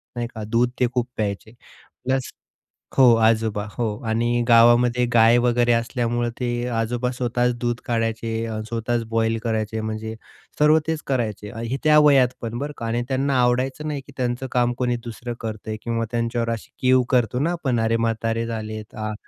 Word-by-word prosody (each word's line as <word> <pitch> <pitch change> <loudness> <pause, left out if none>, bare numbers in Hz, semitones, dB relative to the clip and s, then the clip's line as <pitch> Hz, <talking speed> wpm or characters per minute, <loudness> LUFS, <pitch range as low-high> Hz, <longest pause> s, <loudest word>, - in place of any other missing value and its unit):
नाही 120 -1 -2
का, 110 - -5
दूध 115 +3 +1
ते 125 - +3
खूप 125 -1 0
प्यायचे. 105 0 -3 0.5
प्लस 130 0 -1 0.7
हो 135 - +6
आजोबा, 110 -2 +2
हो. 120 +1 -2 0.2
आणि 120 +2 +1
गावामध्ये 120 +1 +5
गाय 115 +1 +6
वगैरे 120 0 +2
असल्यामुळं 120 0 0
ते 120 -1 -2
आजोबा 120 +2 -1
स्वतःच 125 0 0
दूध 120 0 -1
काढायचे, 115 -1 -2
स्वतःच 115 +1 -1
बॉईल 115 0 +1
करायचे, 110 -1 -1
म्हणजे 110 0 -4 0.4
सर्व 150 +1 +5
तेच 160 -1 -2
करायचे. 110 -6 -2 0.2
हे 130 - -1
त्या 150 0 +6
वयात 140 -4 +5
पण 115 0 -4
बरं 145 +2 -4
का, 115 - -5
आणि 120 +1 -1
त्यांना 135 +1 0
आवडायचं 130 +5 0
नाही 145 -2 -3
की 140 - -14
त्यांचं 125 0 -2
काम 120 -1 +2
कोणी 125 -1 0
दुसरं 120 +1 -6
करतंय 110 -1 -5
किंवा 115 -1 -1
त्यांच्यावर 115 0 -1
अशी 115 - -6
कीव 130 -1 +4
करतो 125 -2 +2
ना 160 +4 +1
आपण, 135 -9 -1
"अरे 115 0 +2
म्हातारे 115 0 -1
झाले." 110 -1 -5
आ 110 0 -3
120 Hz, 170 wpm, -23 LUFS, 115-125 Hz, 0.7 s, हो